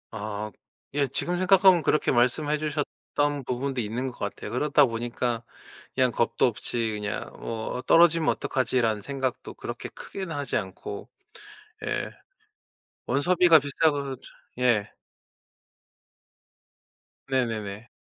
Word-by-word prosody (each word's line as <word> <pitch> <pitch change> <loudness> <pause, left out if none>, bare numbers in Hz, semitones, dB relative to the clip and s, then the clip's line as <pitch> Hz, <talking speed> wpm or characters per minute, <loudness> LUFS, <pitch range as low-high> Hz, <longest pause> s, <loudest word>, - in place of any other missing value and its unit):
아 105 0 -4 0.4
예. 140 -1 +2
지금 175 +7 -2
생각하면 185 -1 +6
그렇게 150 - +2
말씀해 140 +5 +2
주셨던 145 -1 -2
부분도 130 +1 -2
있는 120 +4 -2
것 125 - -7
같아요. 100 -1 -4
그러다 145 +3 +4
보니까 120 0 -2 0.5
그냥 130 -1 +3
겁도 120 +2 +2
없이 115 0 -2
그냥 105 -2 -4
뭐 110 +1 -4
'어 - - -3
떨어지면 165 +1 +5
어떡하지?'라는 120 -5 +1
생각도 135 0 -3
그렇게 - - -6
크게는 190 -5 -6
하지 145 -3 -1
않고. 100 0 -6 0.8
예. - - -1 1.0
원서비가 170 +2 +5
비싸고 140 -1 0
저 - - -26 0.4
예. 120 -5 +2 2.4
네네네. 115 -4 -2
130 Hz, 260 characters per minute, -26 LUFS, 115-145 Hz, 2.4 s, 생각하면